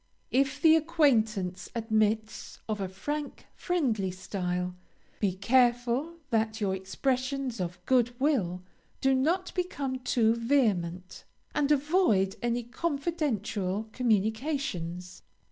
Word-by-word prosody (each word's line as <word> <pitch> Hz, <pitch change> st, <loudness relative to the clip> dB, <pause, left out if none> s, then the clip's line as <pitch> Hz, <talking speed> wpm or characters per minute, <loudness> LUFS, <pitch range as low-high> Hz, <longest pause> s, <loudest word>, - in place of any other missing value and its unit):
If 270 Hz, +1 st, +1 dB
the 320 Hz, -1 st, +7 dB
acquaintance 235 Hz, -, +1 dB
admits 220 Hz, -1 st, 0 dB
of 215 Hz, -2 st, -2 dB
a 190 Hz, -, -1 dB
frank, 290 Hz, +10 st, -5 dB
friendly 250 Hz, -, 0 dB
style, 180 Hz, -1 st, -3 dB, 0.4 s
be 200 Hz, -3 st, +1 dB
careful 245 Hz, -, +2 dB, 0.2 s
that 220 Hz, -1 st, +1 dB
your 200 Hz, -3 st, 0 dB
expressions 255 Hz, +5 st, -2 dB
of 175 Hz, 0 st, -3 dB
good 245 Hz, -1 st, +2 dB
will 200 Hz, -, +1 dB, 0.4 s
do 270 Hz, 0 st, +3 dB
not 335 Hz, +8 st, +1 dB
become 280 Hz, -8 st, -2 dB
too 235 Hz, -3 st, +2 dB
vehement, 205 Hz, -8 st, 0 dB, 0.3 s
and 295 Hz, -1 st, +1 dB
avoid 285 Hz, -, +3 dB
any 240 Hz, 0 st, 0 dB
confidential 240 Hz, -, -2 dB
communications. 220 Hz, -, -1 dB
235 Hz, 105 wpm, -29 LUFS, 195-275 Hz, 0.4 s, the